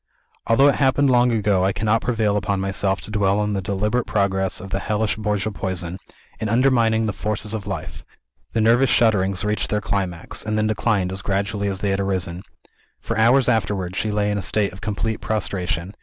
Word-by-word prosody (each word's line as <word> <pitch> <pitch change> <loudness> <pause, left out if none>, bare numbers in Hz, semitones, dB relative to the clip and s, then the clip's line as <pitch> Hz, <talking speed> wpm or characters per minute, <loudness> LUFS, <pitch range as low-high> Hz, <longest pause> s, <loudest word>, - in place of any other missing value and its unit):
Although 125 +5 +5
it - - +2
happened 135 0 +3
long 125 0 +4
ago, 105 -4 +2
I 95 - +2
cannot 110 +2 +1
prevail 110 -4 0
upon 100 -1 -1
myself 95 0 0
to - - -8
dwell 100 -1 +2
on 105 0 0
the 100 - -1
deliberate 105 +5 -1
progress 95 -2 0
of 95 0 -9
the 95 - 0
hellish 105 +1 -1
Borgia 105 0 -1
poison, 95 -2 -3 0.4
in 110 - -2
undermining 115 -2 +3
the 105 - -1
forces 105 +1 -3
of 110 -3 -5
life. - - -6 0.5
The 115 - +1
nervous 120 +4 +4
shudderings 100 -4 +2
reached 105 0 -1
their 105 - +1
climax, 95 -5 -3
and 110 0 -2
then 110 - +1
declined 105 -3 0
as 95 0 -4
gradually 100 +1 -1
as 95 -1 -3
they 100 - 0
had 95 - 0
arisen. 95 -3 -2 0.6
For - - -4
hours 120 +5 +4
afterwards, 100 -6 0
she 110 - -1
lay 105 0 0
in 105 - -1
a - - -3
state 100 0 0
of 95 - -12
complete 110 +1 -2
prostration. 95 -4 -2
105 Hz, 200 wpm, -22 LUFS, 95-110 Hz, 0.6 s, Although